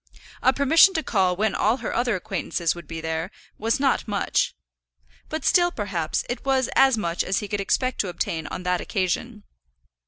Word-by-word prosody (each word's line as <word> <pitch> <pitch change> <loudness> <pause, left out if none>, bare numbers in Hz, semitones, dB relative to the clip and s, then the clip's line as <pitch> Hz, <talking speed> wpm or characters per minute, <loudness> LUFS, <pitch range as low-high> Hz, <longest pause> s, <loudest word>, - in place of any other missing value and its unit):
A 260 - +5
permission 320 +8 +5
to 320 - 0
call 190 -7 +1
when 215 +3 0
all 220 +4 +2
her - - -4
other 240 -2 +1
acquaintances 170 -2 -2
would 175 -3 -11
be 165 -1 -6
there, 160 +2 -3 0.3
was 225 +4 0
not 270 -3 +1
much; 205 -2 0 0.7
but 315 0 -4
still, 350 -1 +4
perhaps, 190 - -2
it 245 - -4
was 265 -2 +1
as 265 -3 +5
much 170 -4 -1
as 195 - -1
he 205 - -2
could 205 0 -2
expect 255 +5 0
to 200 - -4
obtain 165 -3 -3
on 180 - -6
that 180 -1 0
occasion. 205 +3 -2
210 Hz, 185 wpm, -24 LUFS, 180-260 Hz, 0.7 s, A